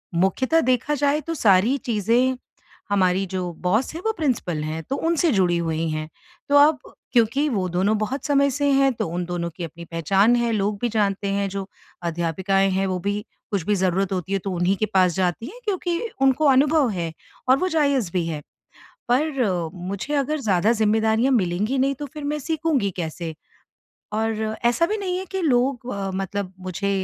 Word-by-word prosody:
मुख्यतः 260 - +2
देखा 255 +4 +1
जाए 290 +2 +1
तो 330 - -4
सारी 215 +2 +4
चीज़ें 240 +3 +1 0.5
हमारी 190 -1 +2
जो 185 -1 -3
बॉस 215 - +1
हैं 335 - -5
वो 445 - +3
प्रिंसिपल 215 - -1
हैं, 155 +1 -3
तो 270 - -3
उनसे 330 -1 +1
जुड़ी 180 -5 +2
हुई 165 -1 -1
हैं। 155 0 -4 0.4
तो 285 - +5
अब 290 0 +6 0.3
क्योंकि 245 +5 +3
वो 195 -7 -1
दोनों 190 +5 +1
बहुत 215 +7 -3
समय 280 -1 +3
से 285 +2 0
हैं, 275 0 +4
तो - - -3
उन 175 +2 -3
दोनों 170 -1 -3
की 175 - -5
अपनी 170 +1 -8
पहचान 190 +8 +2
है, 235 -1 +1
लोग 205 0 0
भी 240 - +1
जानते 200 -2 0
हैं, 200 0 0
जो 195 0 -5 0.4
अध्यापिकाएँ 175 +4 0
हैं 190 +1 0
वो 185 -1 -1
भी 205 +3 -2 0.3
कुछ 200 -5 0
भी 210 - +3
ज़रूरत 190 +1 0
होती 185 +1 -3
है 195 - +1
तो 195 - -3
उन्हीं 175 +3 +2
के 215 - +1
पास 185 -2 +4
जाती 185 +3 0
हैं 470 - -10
क्योंकि 355 -4 -1 0.2
उनको 270 +3 +3
अनुभव 280 0 +4
है 170 -5 -3 0.4
और 260 - +6
वो 370 - +1
जायज़ 280 - +1
भी 180 -3 0
है। 155 -2 -4 0.7
पर 245 - +1
मुझे 190 +10 -5
अगर 285 +2 0
ज़्यादा 205 -1 +2
ज़िम्मेदारियाँ 220 +3 +2
मिलेंगी 210 +5 +1
नहीं 275 +1 +2
तो 290 +3 -6
फिर 300 -2 -7
मैं 300 +1 -1
सीखूँगी 310 -8 0
कैसे? 165 -1 -4 0.8
और 220 0 -1 0.2
ऐसा 240 +8 +3
भी 430 - -1
नहीं 370 -3 -2
है 375 - -4
कि 385 -1 -2
लोग 255 -4 +1
अ, 195 -1 -3
मतलब 195 0 -3
मुझे 185 +2 -3
210 Hz, 190 wpm, -23 LUFS, 185-275 Hz, 0.8 s, अब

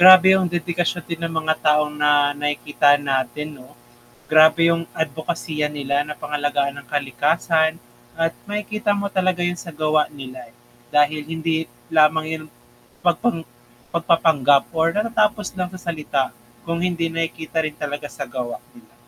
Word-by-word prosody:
Grabe 185 +1 +10
yung 185 -2 0
dedikasyon 175 0 -1
din 170 0 -4
ng 165 -1 -3
mga 155 0 +1
taong 150 0 +3
na 150 - +5 0.3
nakikita 145 0 +1 0.2
natin 135 +3 -1
'no. 130 -1 -15 0.6
Grabe 155 +1 +6
yung 165 0 +1 0.2
adbokasiya 155 0 -3
nila 140 0 -1
na 150 0 -6
pangalagaan 145 -1 -1
ang - - -19
kalikasan, 155 +4 +1 0.5
at 165 0 +2 0.2
makikita 210 0 -2
mo 200 - -2
talaga 185 -1 +1
yun 175 - -3
sa 170 - -8
gawa 155 0 +3 0.2
nila, 130 -1 -8
eh, 115 - -24 0.4
dahil 150 +1 +3
hindi 160 0 -1 0.4
lamang 155 +1 +5
yan 155 -1 -7 0.6
pagpang 175 +2 +1 0.5
pagpapanggap 160 -5 +3
or 160 0 +3
natatapos 210 -2 +1
lang 180 -1 -2
sa 185 - -9
salita 150 -4 0 0.4
kung 170 0 -2
hindi 170 -2 0
nakikita 165 0 -3
rin 155 -1 -4
talaga 145 0 -5
sa 140 - -5
gawa, 120 -1 -4 0.2
'di - - -16
ba? - - -28
160 Hz, 150 wpm, -21 LUFS, 145-170 Hz, 0.6 s, Grabe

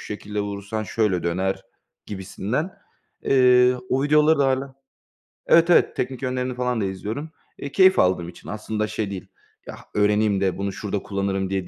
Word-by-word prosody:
şekilde 105 0 -5
vurursan 100 +1 -4
şöyle 105 -3 0
döner." 95 +3 -1 0.4
gibisinden. 105 - -4 0.4
Eee, 125 -1 +5
o 135 +1 +1
videoları 150 +1 +4
da 140 - +3
hâlâ 135 0 -1 0.7
Evet, 170 +1 +5
evet, 175 - +4
teknik 130 0 -3
yönlerini 125 -1 -2
falan 125 -3 -1
da - - 0
izliyorum. 105 +11 -5 0.3
Eee, 140 - -6
keyif 190 -1 +5
aldığım 90 -2 +2
için. 90 - -14
Aslında 110 0 -3
şey 105 -2 -3
değil, 95 -2 -7 0.4
ya, - - -7 0.2
öğreneyim 105 -1 +2
de 95 -2 0
bunu 100 0 -2
şurada 100 +1 -4
kullanırım 100 -1 -2
diye 95 -2 -2
105 Hz, 160 wpm, -23 LUFS, 95-130 Hz, 0.7 s, Eee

